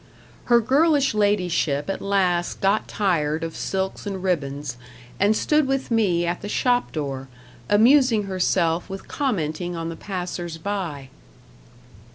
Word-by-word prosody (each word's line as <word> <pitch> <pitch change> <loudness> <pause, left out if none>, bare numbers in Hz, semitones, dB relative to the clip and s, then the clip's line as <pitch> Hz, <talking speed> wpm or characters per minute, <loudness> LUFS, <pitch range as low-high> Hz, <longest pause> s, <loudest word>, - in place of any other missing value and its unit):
Her 240 -1 +5
girlish 280 +3 +3
ladyship 180 -8 +1
at 195 - -3
last 185 -3 0
got 195 +2 +1
tired 160 -6 0
of 165 -1 -5
silks 190 +2 -3
and 190 -2 -4
ribbons, 145 -7 -2 0.4
and 205 +2 +3
stood 300 -2 +2
with 270 -2 -1
me 190 -7 +2
at 175 +1 -2
the 205 - -6
shop 245 +2 +1
door, 135 -3 -4 0.4
amusing 230 +1 +5
herself 180 -3 0
with 195 0 -7
commenting 175 - -2
on 165 0 -4
the 165 - -5
passers 175 -3 -5
by. 165 -7 -4
190 Hz, 135 wpm, -23 LUFS, 165-215 Hz, 0.4 s, Her